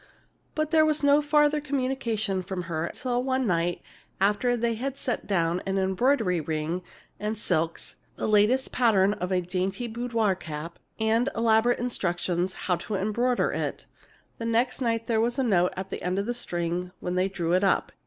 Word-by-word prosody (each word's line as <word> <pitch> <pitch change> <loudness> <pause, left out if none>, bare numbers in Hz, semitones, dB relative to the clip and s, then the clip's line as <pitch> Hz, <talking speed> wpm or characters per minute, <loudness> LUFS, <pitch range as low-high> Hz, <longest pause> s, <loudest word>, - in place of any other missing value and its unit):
But 310 0 -1
there 315 -1 +6
was 305 -1 +1
no 285 +1 +5
further 295 0 +3
communication 255 -8 -1
from 180 0 -4
her 165 -1 -2
till 250 -2 -2
one 260 0 0
night 175 -3 0 0.4
after 210 +5 +2
they 235 0 0
had 265 +4 -4
sent 255 -3 -3
down 175 -2 +1
an 195 0 0
embroidery 190 - +2
ring 160 +3 -2 0.4
and 215 +1 -2
silks, 165 -5 -1 0.2
the - - -3
latest 215 +5 +3
pattern 205 -5 +3
of 180 -2 -4
a 185 -1 +2
dainty 185 +5 -2
boudoir 230 -3 0
cap, 165 -2 -7 0.2
and 225 +4 +2
elaborate 230 +1 +3
instructions 180 -6 -1
how 180 -2 +2
to 215 +1 -4
embroider 235 +6 +1
it. - - -3 0.5
Next 230 +3 0
night 230 -2 0
there 225 -1 +1
was 240 +3 0
a 270 - +2
note 180 -7 +3
on 190 - -3
the - - -4
end 180 +1 -1
of 200 - 0
the 240 - -1
string 175 -5 -2
when 180 - -3
they 185 +1 +1
drew 170 -3 -1
it 185 +2 +3
up. 195 - +2
215 Hz, 175 wpm, -27 LUFS, 180-245 Hz, 0.5 s, there